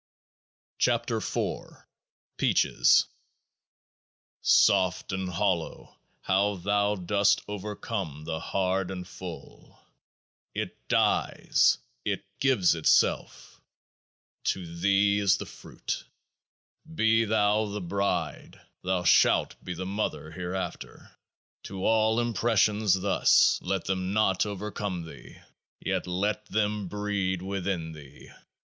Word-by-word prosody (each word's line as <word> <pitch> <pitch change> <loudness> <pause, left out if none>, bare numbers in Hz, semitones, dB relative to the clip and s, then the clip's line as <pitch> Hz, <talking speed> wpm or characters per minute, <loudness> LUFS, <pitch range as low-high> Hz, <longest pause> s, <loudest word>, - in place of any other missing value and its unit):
11 - - +2
KEOAAH - - -3
B - - -25 0.5
PEACHES - - +3 1.4
Soft 95 -2 +3
and 95 -1 -3
hollow, 90 -2 -2 0.3
how 100 +2 +1
thou 100 +3 +1
dost 100 +2 +2
overcome 105 -6 -5
the 80 0 -4
hard 95 +1 -1
and 90 -2 -6
full! 90 -4 -10 0.8
It - - -5
dies, - - +2 0.3
it 100 -1 -2
gives 125 -12 +3
itself; 80 -1 +1 0.8
to 95 - -1
Thee 100 +2 +3
is 100 0 +3
the - - -6
fruit! - - -6 0.9
Be 115 -6 +3
thou 105 0 +2
the 105 0 -4
Bride; 90 -4 -3 0.2
thou 90 -1 -1
shalt 90 - +4
be 90 - -5
the 95 +2 -5
Mother 100 +3 -3
hereafter. 90 +1 -6 0.5
To 95 -1 -5
all 110 0 +3
impressions 110 -4 +2
thus. 100 0 +4
Let 95 -2 -2
them 95 0 -2
not 105 -2 +2
over 105 +1 -5
come 95 -5 -4
thee; 80 - -12 0.4
yet - - -2
let 105 +4 -1
them 105 -2 -1
breed 100 -2 -2
within 95 -4 -3
thee. 75 -3 -13
95 Hz, 105 wpm, -27 LUFS, 90-105 Hz, 1.4 s, shalt